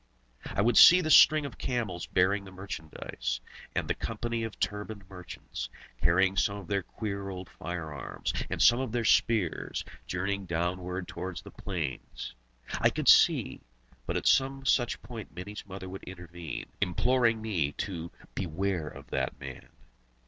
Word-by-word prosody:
I 100 - 0
could 120 +1 +3
see 180 - +11
the 155 - 0
string 155 0 +8
of 140 - -8
camels 110 -9 -2
bearing 100 +2 +2
the 95 - -10
merchandise, 80 -10 -5 0.4
and - - 0
the - - +2
company 115 +1 -3
of 110 -2 -6
turbaned 105 -1 -3
merchants, 90 -2 -7 0.3
carrying 95 +3 +4
some 100 +1 +1
of 100 - -8
their 100 +3 0
queer 100 -2 -5
old 95 -1 -6
firearms, 80 -6 -5 0.2
and - - -3
some 120 - +6
of 130 -3 -2
their 120 -1 0
spears, 105 -9 +2 0.2
journeying 100 +1 -2
downward 90 +2 -2
towards 90 0 -5
the - - -11
plains. 80 -10 -5 0.5
I - - +5
could - - +1
see - - +5 0.5
but - - 0
at - - -4
some 135 0 +3
such 120 -2 +2
point 115 -5 -8
Mini's 100 +3 -7
mother 95 -1 -7
would 95 +1 -8
intervene, 85 -4 -7 0.2
imploring 115 +5 +3
me 90 -10 -1
to 85 -2 -4 0.2
"beware 90 -1 -1
of - - -11
that - - -1
man." 65 -3 -8
95 Hz, 155 wpm, -30 LUFS, 90-110 Hz, 0.5 s, see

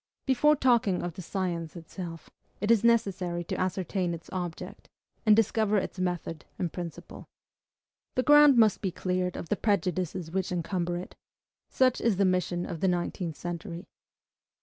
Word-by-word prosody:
Before 300 +3 +4
talking 235 -10 +2
of 175 -1 -3
the 185 - -8
science 175 -3 -3
itself, 165 0 -8 0.3
it 210 +3 +1
is 230 -2 +4
necessary 190 -7 +1
to - - -4
ascertain 185 -1 -1
its 165 - -13
object, 175 -3 -6 0.4
and 210 - +8
discover 220 -1 +2
its 190 - -3
method 175 -3 -3
and 175 -4 -2
principle. 175 -1 -8 0.9
The 255 - +2
ground 295 -2 +7
must 220 -3 +4
be 195 - 0
cleared 180 0 -2
of 165 - -7
the - - +2
prejudices 185 -4 -1
which 190 0 -2
encumber 175 0 -1
it. 180 - -7 0.6
Such 255 -2 +2
is 230 -5 +2
the 200 - +3
mission 180 -1 0
of 165 - -5
the 190 - +1
nineteenth 175 -2 -2
century. 175 0 -6
185 Hz, 155 wpm, -28 LUFS, 175-210 Hz, 0.9 s, and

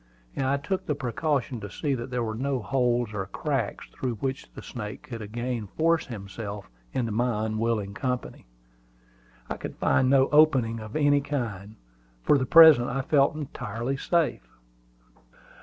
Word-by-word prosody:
I 135 +1 +1
took 185 +7 -3
the 150 - 0
precaution 135 -1 -1
to 105 -1 -7
see 140 - -2
that 120 -1 -4
there 125 -1 -1
were 110 -1 -3
no 130 +3 -1
holes 120 0 0
or 95 -2 -3
cracks 135 -1 -2
through 125 -3 -3
which 135 +4 -4
the - - -9
snake 105 -4 -7
could 115 -3 -7
again 115 +1 -4
force 165 +1 +2
himself 100 -3 -7 0.2
into 115 -3 -1
my 110 -1 0
unwilling 110 -2 -1
company. 125 - -4 1.0
I - - -4
could - - -7
find 130 0 +2
no 135 -1 +5
opening 135 -7 +4
of 110 0 -9
any 145 -2 +3
kind. 115 -8 -4 0.5
For 145 - +4
the 130 - -1
present 160 -7 +8
I 135 +2 -2
felt 140 +1 +3
entirely 125 -4 -4
safe. 155 - 0
125 Hz, 155 wpm, -26 LUFS, 110-140 Hz, 1.0 s, present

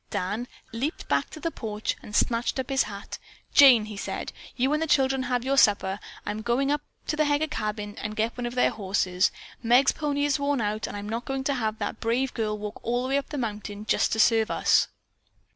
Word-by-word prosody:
Dan 205 +7 -2 0.3
leaped 270 +8 -3
back - - +1
to - - -9
the 330 +1 -2
porch 215 -5 -3
and 210 - -8
snatched 235 +2 +1
up 260 +1 -3
his 270 0 +3
hat. 200 -1 -8 0.3
"Jane," 255 -7 +8
he 215 -1 -8
said, - - -4 0.2
"you 265 +3 +1
and 305 - +1
the 320 - 0
children 270 -2 +3
have 250 -1 0
your 275 +1 +3
supper. 200 -3 +3 0.3
I'm 210 +1 -3
going 245 +5 +1
up 295 0 0 0.2
to - - -1
the 305 0 +2
Heger 290 +1 +2
cabin 210 -6 -4
and 215 0 -4
get 220 +2 -1
one 245 -1 -3
of 240 - -6
their 250 - +3
horses. 185 -2 +1 0.3
Meg's 245 +3 +5
pony 290 -1 -1
is 290 -1 +1
worn 285 -1 +1
out, 215 0 -1
and 205 - -6
I'm 205 0 -6
not 230 +3 -3
going 270 0 -2
to 280 - +1
have 220 -4 -1
that 225 - -4
brave 245 +3 0
girl 215 -2 -1
walk 210 0 -6
all 245 +1 -1
the 260 - -3
way 275 - +2
up 280 - -9
the 295 - -4
mountain, 210 -3 -4
just - - +2
to 220 - -1
serve 225 0 +4
us." - - +3
235 Hz, 230 wpm, -26 LUFS, 210-270 Hz, 0.3 s, Jane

